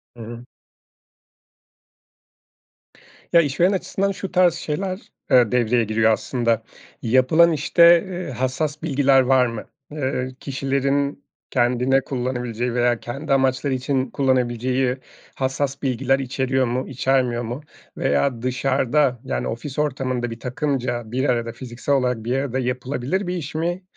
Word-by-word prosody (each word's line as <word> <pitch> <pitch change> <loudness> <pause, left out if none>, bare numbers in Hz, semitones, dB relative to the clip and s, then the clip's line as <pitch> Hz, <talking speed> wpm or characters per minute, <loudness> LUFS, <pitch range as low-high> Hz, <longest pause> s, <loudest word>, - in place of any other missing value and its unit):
Hı 115 - -9
hı. 120 +2 -9 2.9
Ya, 170 - +8
işveren 170 +5 +2
açısından 195 +1 -1
şu 195 0 -6
tarz 180 -2 +4
şeyler, 185 +4 -4 0.2
eee, 125 -4 +5
devreye 120 -1 +2
giriyor 110 +1 +2
aslında. 115 0 0 0.4
Yapılan, 130 +8 +4
işte, 170 +3 +5
ııı, 180 -6 -5
hassas 140 +5 -2
bilgiler 135 -3 +4
var 130 0 +4
mı? 115 -2 -5 0.3
Iıı, 130 -3 -3
kişilerin 140 +1 -1 0.3
kendine 125 +1 +2
kullanabileceği 125 -2 -3
veya 120 -1 +2
kendi 135 +4 -3
amaçları 130 0 +1
için 130 0 -1
kullanabileceği 130 -1 0 0.4
hassas 135 +1 -2
bilgiler 135 0 +1
içeriyor 130 0 0
mu, 125 +2 -2
içermiyor 130 -2 0
mu 120 +6 -5 0.4
veya 115 - +1
dışarıda 130 +1 +1
yani 130 - -2
ofis 130 +5 -5
ortamında 130 -4 -1
bir 115 - -7
takımca 125 -2 -2
bir 130 +3 0
arada 115 -1 0
fiziksel 120 +3 -3
olarak 125 -4 0
bir 125 +3 -1
arada 130 -1 -2
yapılabilir 130 +8 -2
bir 180 - -2
iş 155 -3 -6
mi 175 +3 -2
130 Hz, 130 wpm, -22 LUFS, 125-145 Hz, 2.9 s, Ya